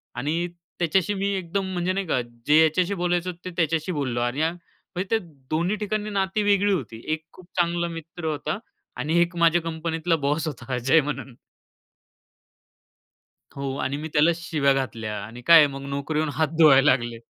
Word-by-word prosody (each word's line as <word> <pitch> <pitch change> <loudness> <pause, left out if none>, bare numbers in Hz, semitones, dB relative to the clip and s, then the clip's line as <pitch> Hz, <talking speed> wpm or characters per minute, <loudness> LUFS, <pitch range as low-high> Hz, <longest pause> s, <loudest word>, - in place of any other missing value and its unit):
आणि 155 +7 -1 0.3
त्याच्याशी 180 +3 +1
मी 200 0 -1
एकदम 190 +1 -2
म्हणजे 180 +1 0
नाही 195 0 -2
का 130 -5 +1 0.3
जे 150 - +5
याच्याशी 175 +5 +2
बोलायचं 175 0 0
ते 185 - -3
त्याच्याशी 165 0 0
बोललो 135 -7 -2
आणि 120 +5 -1
अ, 160 +1 +2
म्हणजे 175 +1 -8
ते 225 - +3 0.3
दोन्ही 170 +6 +1
ठिकाणी 210 0 -2
नाती 200 +1 0
वेगळी 205 0 +3
होती. 115 -10 -4
एक 155 0 -4
खूप 185 - -15
चांगला 170 0 +1
मित्र 165 0 -8
होता 155 +1 -2 0.4
आणि 160 +3 +1
एक 175 +1 0
माझ्या 170 0 +4
कंपनीतला 165 +1 -1
बॉस 150 +3 0
होता 135 -2 -5
अजय 135 +6 +4
म्हणून. 140 -3 -5 2.2
हो. 135 -1 -3
आणि 140 +2 -1
मी 155 +2 -5
त्याला 150 +3 +5
शिव्या 155 -4 +1
घातल्या 115 -5 -3
आणि 115 +3 -10
काय 170 0 +10
आहे 150 - +7
मग 135 0 -7
नोकरी 140 +2 -2
होऊन 155 -1 0
हात 160 -1 +1
धुवायला 145 -3 +7
लागले 120 -2 0
160 Hz, 175 wpm, -24 LUFS, 140-175 Hz, 2.2 s, काय